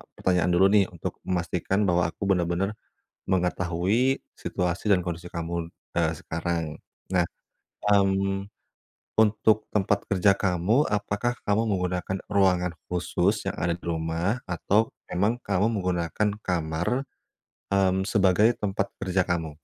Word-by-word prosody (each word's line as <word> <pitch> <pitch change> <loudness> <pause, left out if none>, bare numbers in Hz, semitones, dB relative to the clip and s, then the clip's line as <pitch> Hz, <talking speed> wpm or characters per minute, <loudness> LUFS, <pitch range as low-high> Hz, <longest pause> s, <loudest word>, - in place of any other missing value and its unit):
pertanyaan 90 -1 +1
dulu 95 +3 +5
nih? 100 -1 +5
Untuk 85 - -5
memastikan 90 +2 0
bahwa 90 -3 +2
aku 100 - -3
bener-bener, 90 +3 +1 0.5
mengetahui 90 +7 +1 0.2
situasi 90 +4 -2
dan 90 -3 +3
kondisi 85 0 -5
kamu, 85 0 -4 0.2
eee, 80 -2 +2
sekarang 85 -1 -3 0.4
nah, 90 -2 +3 0.6
mmm, 95 -1 +2 0.7
untuk 110 0 +3
tempat 100 0 +1
kerja 100 0 +4
kamu 100 - +2
apakah 105 +3 -1
kamu 105 +2 +2
menggunakan 90 +1 -2
ruangan 90 -3 +3
khusus 90 +3 0
yang - - -5
ada 85 0 0
di - - -33
rumah 85 +6 -1
atau 100 +5 +1 0.2
emang 105 +7 +1
kamu 100 +1 +2
menggunakan 90 +1 0
kamar, 90 +8 -1 0.7
mmm, 95 -1 +3
sebagai 105 +3 +4
tempat 100 -1 -1 0.2
kerja 95 0 +2
kamu? 85 -3 -1
95 Hz, 120 wpm, -26 LUFS, 85-100 Hz, 0.7 s, dulu